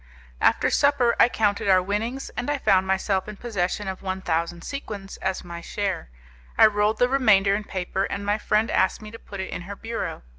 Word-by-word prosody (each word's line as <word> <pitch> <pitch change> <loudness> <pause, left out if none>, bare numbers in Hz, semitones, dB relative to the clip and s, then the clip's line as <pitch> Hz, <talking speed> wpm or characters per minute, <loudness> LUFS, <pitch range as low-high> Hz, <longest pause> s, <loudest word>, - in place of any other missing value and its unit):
After - - +3
supper 280 -5 +3
I - - +7
counted 205 -4 0
our 185 -1 +6
winnings, 215 +8 -3
and 245 +3 -4
I 290 - +1
found 190 -7 +3
myself 190 0 0
in 210 -1 -8
possession 205 -3 -2
of 190 -1 -5
one 190 -1 -3
thousand 170 -1 -2
sequins 210 -8 -6
as 190 0 -2
my 170 -1 -8
share. 195 - -3 0.5
I - - +8
rolled 210 0 +2
the 245 - +4
remainder 215 -7 +4
in 210 +1 -2
paper, 190 0 -2
and 200 0 -4
my 205 +1 +1
friend 215 +1 +1
asked 190 +3 +1
me 215 - -9
to 230 - -10
put 200 - -9
it 190 - -4
in - - -4
her 200 +3 -7
bureau. 225 - -5
200 Hz, 210 wpm, -24 LUFS, 190-225 Hz, 0.5 s, I